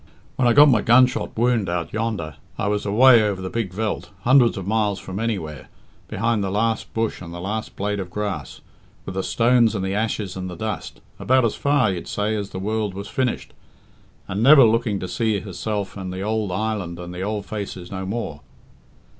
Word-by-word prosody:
When 130 - +2
I 120 - +5
got 145 +3 +8
my 120 -7 +4
gun 120 +4 +6
shot 125 - -4
wound 115 -4 +2
out 85 -1 -3
yonder, 110 -9 -3 0.2
I 105 - -1
was 105 0 -1
away 120 +3 +7
over 105 -3 0
the 95 0 -5
big 115 -6 -2
veldt, 105 +3 -3
hundreds 125 0 +4
of 95 - -5
miles 105 -1 +1
from 95 +1 -6
anywhere, 95 -11 -3 0.4
behind 115 +1 0
the 95 - -1
last 110 +3 -1
bush 115 -1 -1
and 85 -2 -8
the 85 - -7
last 105 +5 -4
blade 105 +1 -2
of 95 -2 -5
grass, 95 -7 -4 0.4
with 95 - -5
the 95 - -1
stones 115 +1 +3
and 95 -2 -2
the 95 - -2
ashes 105 -2 -2
and 95 -1 -5
the 90 - -7
dust 110 +4 -5 0.2
about 130 -1 +3
as 110 - +1
far, 140 -7 +2
you'd 90 -2 -5
say, 105 +1 -1
as 100 -2 -3
the - - -7
world 105 0 -2
was 100 +1 -6
finished, 130 -2 -2 0.7
and 100 +3 -3
never 140 +3 +8
looking 115 -2 +2
to 90 - -4
see 110 0 0
herself 100 0 -4
and 95 -2 -5
the 95 +2 -4
ould 110 -2 -1
island 100 -3 -2
and 90 0 -8
the 90 - -6
ould 105 0 -3
faces 100 -4 -6
no 95 -1 -4
more. 95 -7 -4
105 Hz, 205 wpm, -22 LUFS, 95-115 Hz, 0.7 s, got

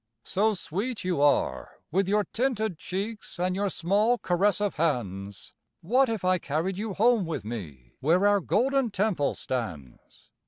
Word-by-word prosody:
So 215 +2 +1
sweet 205 +8 -3
you 180 -5 0
are, 140 - +1
with 190 +3 +1
your 210 +1 +2
tinted 220 - 0
cheeks 200 +1 -5
and 180 +1 0
your 200 +1 0
small 205 +8 +2
caressive 195 +1 +1
hands, 100 - -2 0.3
What 250 +8 +3
if 220 -5 -2
I 185 0 +3
carried 165 +6 -2
you 210 -2 -3
home 230 0 +4
with 155 - -4
me, 75 - -7
where 175 +7 +3
our 205 0 +5
Golden 260 +7 +1
Temple 195 -7 0
stands? 90 - -6
185 Hz, 150 wpm, -27 LUFS, 145-210 Hz, 0.3 s, our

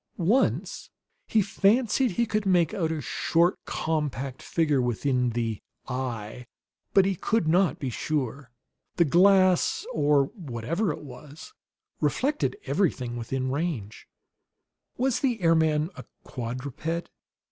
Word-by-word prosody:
Once 205 +10 0 0.4
he 215 -2 +3
fancied 220 +6 +2
that 180 - -7
he 235 - +2
could 215 -1 -1
make 180 -5 +2
out 165 -4 -1
a 160 - -2
short, 170 +6 +1
compact 140 -5 -2
figure 150 -5 +1
within 125 +1 0
the 115 -2 -2 0.3
"eye"; 125 -2 -5 0.4
but 195 -1 +5
he 195 - +1
could 210 0 0
not 175 -2 +3
be 135 -3 -4
sure. 135 -1 -3 0.5
The 170 - +4
glass, 185 +3 +4
or 145 -2 +3
whatever 165 - -2
it 150 - -7
was, 145 - -11 0.5
reflected 295 +9 0
everything 130 -11 0
within 130 +2 -3
range. 140 - -4 0.9
Was 255 0 +1
the 250 -5 0
airman 160 -2 +2
a - - -9 0.2
quadruped? 130 +7 -5
155 Hz, 125 wpm, -26 LUFS, 130-190 Hz, 0.9 s, but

